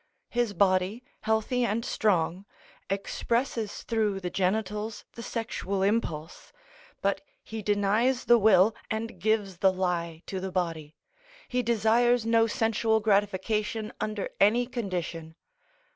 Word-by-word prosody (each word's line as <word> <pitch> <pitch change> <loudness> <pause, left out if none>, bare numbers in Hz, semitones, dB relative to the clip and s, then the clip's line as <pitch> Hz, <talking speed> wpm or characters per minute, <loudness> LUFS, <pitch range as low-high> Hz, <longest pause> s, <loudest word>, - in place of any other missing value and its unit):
His 240 -3 0
body, 190 +5 +2 0.2
healthy 220 +3 0
and 230 0 0
strong, 185 -2 +1 0.4
expresses 225 +3 -2
through 215 -4 0
the 180 -2 -4
genitals, 210 +3 -1
the 235 - -8
sexual 215 -5 -3
impulse; 175 -7 -2 0.5
but - - +1 0.2
he 220 0 -6
denies 210 +5 +1
the 240 -1 +6
will 205 0 +5 0.2
and 220 -3 -4
gives 205 -2 0
the 190 - +5
lie 175 -3 -2
to 190 - -4
the 190 0 -4
body; 165 -4 -3 0.5
he 250 0 0
desires 235 +1 +3
no 230 0 +4
sensual 225 0 +1
gratification 210 +1 0
under 215 -2 -2
any 225 +5 +4
condition. 175 -9 -4
210 Hz, 120 wpm, -28 LUFS, 190-225 Hz, 0.5 s, the